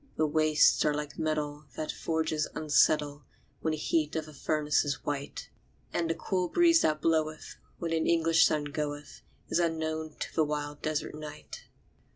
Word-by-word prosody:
The 155 - +3
wastes 155 0 +4
are 150 -1 +2
like 150 0 -5
metal 150 -1 -2
that 155 - -3
forges 160 -1 -1
unsettle 150 -1 +2 0.4
When 160 - -1
the 155 - -1
heat 155 0 0
of 160 -1 -2
the 155 - -12
furnace 150 +1 +1
is 140 -3 -3
white; 145 -1 -4 0.4
And 165 -1 0
the 165 - 0
cool 185 -2 -1
breeze 335 -1 +5
that 155 0 +1
bloweth 155 -1 0 0.2
when 165 -1 -3
an 160 -1 +1
English 165 -1 +4
sun 150 -1 0
goeth, 145 0 -5 0.3
Is - - +1
unknown 160 -2 -2
to - - -4
the 160 - +3
wild 145 -1 -3
desert 155 -1 -2
night. 150 0 -9
155 Hz, 170 wpm, -29 LUFS, 150-160 Hz, 0.4 s, breeze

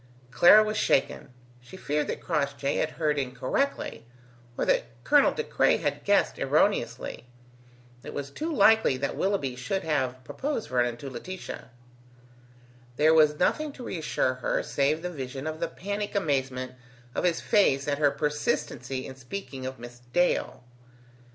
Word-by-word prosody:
Clara 175 +10 +7
was 215 0 -2
shaken: 135 - +1 0.3
she 125 +9 -13
feared 150 -4 -1
that - - -4
Crossjay 140 -1 -1
had - - +1
heard 150 -3 +1
incorrectly, 130 - -2 0.5
or - - 0
that - - +2 0.2
Colonel - - +5
De - - -3
Craye - - +2
had - - -2
guessed - - +2
erroneously. 125 - 0 0.8
It - - -7
was 140 -1 -5
too 320 - -4
likely 220 - +4
that 140 +2 -2
Willoughby 190 -10 -1
should 125 +10 -3
have 130 -5 -1
proposed 270 - -4
Vernon 120 -1 +1
to 135 +3 -7
Laetitia. 185 +4 -7 1.3
There 155 +4 +4
was 150 -2 +5
nothing 305 - +1
to 255 - -10
reassure 155 -6 -1
her - - 0
save 150 +4 0
the 180 - -3
vision 135 -2 -6
of 155 0 -4
the - - -1
panic 205 +2 -4
amazement 130 -7 -1 0.4
of - - -2
his 175 -2 +2
face 140 -11 +2
at 145 0 0
her 145 -1 +5
persistency 135 -3 -2
in 130 - -8
speaking 130 0 -7
of 130 0 -6
Miss 120 +1 -11
Dale. 130 -7 +1
145 Hz, 150 wpm, -27 LUFS, 130-180 Hz, 1.3 s, Clara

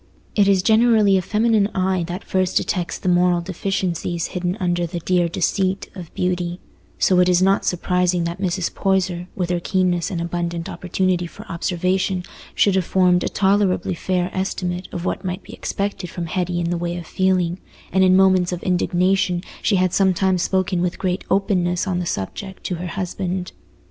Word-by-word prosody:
It 205 -2 +3
is 195 -2 +3
generally 220 -2 +4
a 190 - +3
feminine 215 +1 +2
eye 185 -1 +1
that 180 +2 -5
first 185 -1 0
detects 175 -3 -1
the - - -6
moral 175 0 +3
deficiencies 175 -1 -2
hidden 180 +1 -2
under 175 -2 0
the 170 +1 -4
"dear 175 0 +1
deceit" 190 +3 -1
of 180 -5 -9
beauty, 180 -1 -1 0.4
so 185 -1 +3
it 180 0 +4
is 180 -1 +4
not 195 +1 +3
surprising 180 0 +1
that 170 +3 -4
Mrs. 185 -2 -1
Poyser, 185 -2 0
with 180 -2 -1
her 175 - +1
keenness 180 -1 0
and 180 -5 -3
abundant 170 0 -3
opportunity 180 -1 -1
for - - -12
observation, 185 +2 0 0.3
should 200 - +4
have 190 -1 +2
formed 180 0 +3
a - - -1
tolerably 195 -1 +1
fair 180 +1 -1
estimate 180 -1 -2
of 175 0 -5
what - - -2
might 185 +1 -4
be - - -12
expected 200 -2 -3
from 175 - -5
Hetty 180 0 -1
in 170 0 -1
the 175 - -1
way 175 0 -2
of 175 - -7
feeling, 185 -1 +1 0.3
and 190 +1 +3
in 185 0 +5
moments 185 -2 +4
of 180 -1 -4
indignation 180 0 +1 0.2
she 205 - +2
had 185 -1 +2
sometimes 190 -1 +2
spoken 185 -1 0
with 180 -1 -1
great 185 0 -1
openness 185 -2 +1
on 185 -3 -1
the 175 - -3
subject 190 - -5
to - - -2
her 175 +1 -4
husband. 180 0 -3
180 Hz, 180 wpm, -21 LUFS, 175-190 Hz, 0.4 s, in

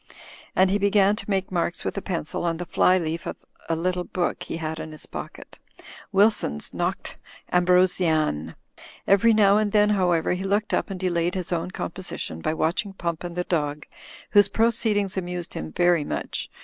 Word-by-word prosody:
And 185 0 +4
he 205 - +2
began 200 0 +4
to 210 - -7
make 190 -2 -1
marks 170 -1 -1
with - - -2
a 200 - -3
pencil 170 -4 -3
on 170 -1 0
the 175 - -5
fly 185 +2 +3
leaf 165 -2 -3
of - - -4 0.3
a 165 - +2
little 180 +2 -1
book 175 0 -2
he - - -5
had 160 -1 -4
in 155 - -6
his 155 - -7
pocket - - -9 0.3
— - - -16
^Wilson's 195 - +2
Nodes - - -3 0.4
Ambrosiana. 175 - +2 0.5
Every 200 +4 +5
now 205 -2 +5
and 210 -1 0
then, 210 0 +4
however, 180 -5 +2
he 180 +1 -3
looked 205 +2 0
up - - 0
and 190 -2 -5
delayed 175 -1 0
his 185 -2 -3
own 170 +1 -2
composition 175 - -5
by 155 - -1
watching 175 +6 -1
Pump 170 -3 -3
and 175 -1 -6
the 180 - -1
dog, 150 -4 -2 0.5
whose 205 -2 +6
proceedings 215 -3 +1
amused 180 -1 -4
him 80 0 -5
very 175 - +3
much. - - -4
180 Hz, 185 wpm, -24 LUFS, 165-195 Hz, 0.5 s, whose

